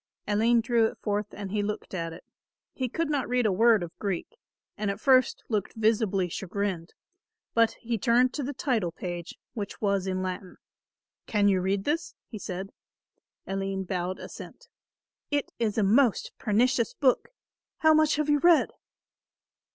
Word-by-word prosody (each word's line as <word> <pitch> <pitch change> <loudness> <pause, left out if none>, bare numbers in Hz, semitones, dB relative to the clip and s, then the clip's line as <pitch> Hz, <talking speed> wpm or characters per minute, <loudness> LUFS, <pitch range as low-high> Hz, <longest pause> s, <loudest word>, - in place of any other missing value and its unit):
Aline 225 +3 +3
drew 230 -1 +3
it - - -8
forth 210 -1 -1
and 200 -2 -7
he 210 0 0
looked 210 0 -4
at 165 -2 -3
it. 165 - -11 0.5
He 255 -2 -2
could 330 +6 -1
not 285 -5 -1
read 250 -1 +2
a 210 - +3
word 220 0 +4
of 170 - -8
Greek, 195 -4 -2 0.5
and 210 -1 -2
at 200 0 -3
first 255 +1 +3
looked 210 -4 -2
visibly 215 -4 +2
chagrined; 185 -1 -4 0.6
but 230 -1 +4
he 230 -1 -2
turned 245 +4 +3
to 295 - -3
the 280 +1 -3
title 240 - -1
page, 175 0 -6 0.2
which 205 -3 -5
was 200 -2 0
in 185 0 -1
Latin. 185 0 -5 0.7
"Can 205 -2 +2
you 190 -2 +3
read 195 +1 0
this?" 325 +6 -2
he 215 - -8
said. 190 +1 -5 0.7
Aline 195 0 -2
bowed 185 0 -2
assent. - - -10 0.6
"It 290 -1 -1
is 220 -2 0
a 215 - +3
most 230 +3 +3
pernicious 235 +2 +2
book. 260 -4 +2 0.5
How 315 0 +5
much 310 -1 +4
have 300 0 0
you 295 -1 +3
read?" 340 +1 +5
210 Hz, 165 wpm, -28 LUFS, 195-250 Hz, 0.7 s, How